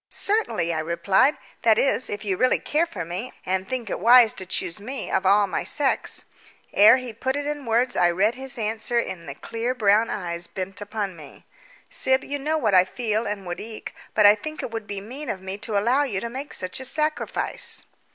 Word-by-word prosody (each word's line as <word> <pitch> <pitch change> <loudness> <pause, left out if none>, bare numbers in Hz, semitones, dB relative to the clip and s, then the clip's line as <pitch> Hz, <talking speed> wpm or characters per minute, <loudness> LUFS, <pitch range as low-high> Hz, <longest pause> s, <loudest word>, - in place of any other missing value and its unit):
"Certainly," 400 - +1
I 160 - -1
replied. 170 - +2 0.2
"That 225 -2 +4
is, 265 -2 +2
if 205 0 -5
you 195 -2 0
really 255 +7 +3
care 320 +3 0
for 175 - -6
me, 185 +9 -5
and 190 +1 -1
think 255 -4 -3
it - - -3
wise 235 +2 +7
to 190 - -7
choose 180 +1 -3
me 260 +5 -5
of 190 - +1
all 205 +1 +5
my 195 - -2
sex." 280 -2 0 0.5
Ere 215 +5 +8
he 250 -3 -6
put 260 +4 -2
it 290 0 -2
in 290 -3 -4
words 240 +2 +2
I 175 - +4
read 195 +6 +2
his 265 0 -4
answer 220 +1 -1
in 180 -8 -2
the 140 - -6
clear 230 - -3
brown 215 -1 +3
eyes 170 -3 -3
bent 190 +2 -5
upon 205 -2 -4
me. 150 -4 -14 0.4
"Syb, 260 0 0
you 285 +1 -4
know 305 +3 0
what 220 -9 +1
I 185 -1 +7
feel 220 +3 -2
and 205 -2 -4
would 175 0 -5
like, 220 0 -8 0.2
but 210 - +5
I 205 - +10
think 310 +9 -6
it - - -5
would 225 -2 -5
be 200 -1 -5
mean 265 +8 -8
of 190 - -3
me 190 +2 -6
to 210 0 -2
allow 240 +7 +3
you 240 -10 -1
to 235 - -4
make 275 +4 -6
such 185 +5 -3
a 260 - -6
sacrifice." 310 - -1
220 Hz, 220 wpm, -24 LUFS, 190-255 Hz, 0.5 s, I